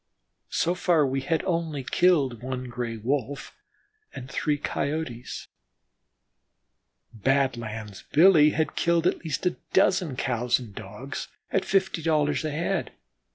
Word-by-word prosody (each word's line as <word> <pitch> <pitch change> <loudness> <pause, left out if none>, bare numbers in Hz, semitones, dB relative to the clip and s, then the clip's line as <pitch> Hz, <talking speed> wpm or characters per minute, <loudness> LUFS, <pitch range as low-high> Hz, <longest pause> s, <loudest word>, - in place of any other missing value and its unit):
So 175 - +1
far 175 -4 +3
we 135 0 -1
had 160 +4 0 0.5
killed 165 -8 +4
only - - -10
one 130 -1 -4
Gray 120 -2 -4
wolf 135 +4 -3 0.6
and 125 - -7
three 150 -2 0
Coyotes; 140 -4 -3 1.7
Badlands 115 -4 -1
Billy 160 -2 +7
had 155 0 -1
killed 170 -1 +2
at - - +1
least 160 +1 -3
a 180 - +1 0.2
dozen 180 -6 +3
Cows 125 -2 +1
and 120 -5 -9
Dogs - - -7 0.2
at - - +2
fifty 190 -3 +1
dollars 150 -2 +1
a 155 - -1
head. 170 +5 -2
145 Hz, 125 wpm, -26 LUFS, 125-165 Hz, 1.7 s, Billy